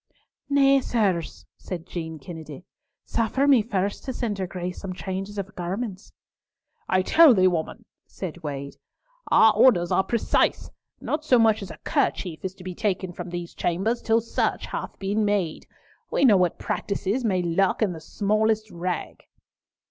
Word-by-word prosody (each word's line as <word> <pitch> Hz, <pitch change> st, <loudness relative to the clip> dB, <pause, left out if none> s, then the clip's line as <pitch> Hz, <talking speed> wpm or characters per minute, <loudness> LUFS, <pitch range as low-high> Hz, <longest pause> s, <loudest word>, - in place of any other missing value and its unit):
"Nay, 275 Hz, -1 st, +5 dB
sirs," 200 Hz, -10 st, -1 dB
said 175 Hz, -3 st, -6 dB
Jean 160 Hz, -3 st, -6 dB
Kennedy. 160 Hz, +2 st, -9 dB, 0.4 s
"Suffer 230 Hz, +5 st, 0 dB
me 275 Hz, -5 st, +6 dB
first 200 Hz, -2 st, -2 dB
to 260 Hz, -, -4 dB
send 220 Hz, -5 st, -3 dB
her 190 Hz, -, -2 dB
Grace 180 Hz, 0 st, -5 dB
some 195 Hz, -2 st, -5 dB
changes 195 Hz, +2 st, -5 dB
of 200 Hz, +1 st, -5 dB
garments." 190 Hz, +3 st, -5 dB, 0.8 s
"I 185 Hz, 0 st, +3 dB
tell 315 Hz, -, +7 dB
thee, 185 Hz, -1 st, +4 dB
woman," 180 Hz, +6 st, -2 dB, 0.2 s
said 175 Hz, -3 st, -7 dB
Wade, 140 Hz, -2 st, -6 dB, 0.5 s
"our 220 Hz, -1 st, +6 dB
orders 210 Hz, -6 st, +4 dB
are 190 Hz, -, +3 dB
precise! 235 Hz, +1 st, 0 dB, 0.3 s
Not 305 Hz, +1 st, -2 dB
so 265 Hz, -5 st, +4 dB
much 220 Hz, -2 st, +4 dB
as 195 Hz, -, -7 dB
a 160 Hz, -, -9 dB
kerchief 170 Hz, -4 st, -1 dB
is 190 Hz, 0 st, -4 dB
to 190 Hz, -, -13 dB
be 185 Hz, 0 st, -5 dB
taken 185 Hz, -2 st, -2 dB
from 175 Hz, +1 st, -7 dB
these 175 Hz, -1 st, -6 dB
chambers 195 Hz, +8 st, -1 dB
till 225 Hz, 0 st, +2 dB
search 230 Hz, -, -1 dB
hath -, -, -6 dB
been 200 Hz, +2 st, -1 dB
made. 200 Hz, -6 st, -1 dB, 0.4 s
We 275 Hz, -, +2 dB
know 220 Hz, -6 st, +7 dB
what 180 Hz, -2 st, +1 dB
practices 200 Hz, +5 st, -2 dB
may 185 Hz, -5 st, +1 dB
lurk 180 Hz, +5 st, +1 dB
in 195 Hz, -4 st, 0 dB
the 160 Hz, -, -9 dB
smallest 215 Hz, +4 st, 0 dB
rag." 175 Hz, +1 st, -4 dB
195 Hz, 165 wpm, -25 LUFS, 175-220 Hz, 0.8 s, tell